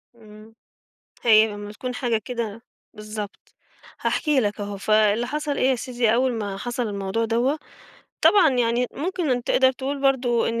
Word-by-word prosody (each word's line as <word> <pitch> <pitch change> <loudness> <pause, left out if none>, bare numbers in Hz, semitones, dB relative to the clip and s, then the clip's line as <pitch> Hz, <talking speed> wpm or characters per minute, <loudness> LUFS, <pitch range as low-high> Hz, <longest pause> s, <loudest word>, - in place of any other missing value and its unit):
إمم. 215 0 -16 0.7
هي 220 -2 +6
لمّا 205 0 -8
تكون 250 +4 -5
حاجة 240 -4 0
كده 230 -2 -4 0.3
بالضبط. 210 -1 -8 0.5
هاحكي 300 -4 +1
لك 210 -2 -2
أهو، 205 0 -4
فاللي 215 +3 +2
حصل 295 +1 -3
إيه 260 - +3
يا 260 - +3
سيدي؟ 240 -2 0
أول 255 +1 +2
ما 205 -4 -4
حصل 240 +2 -3
الموضوع 200 +2 -2
دوّة، 245 +7 +1 0.6
طبعًا 385 -7 +6
يعني 245 -1 +1
ممكن 350 0 -2
أنت 245 -1 -1
تقدر 260 0 +4
تقول 275 +2 -4
برضه 250 -4 +2
إن 230 0 -2
235 Hz, 160 wpm, -23 LUFS, 215-260 Hz, 0.7 s, هي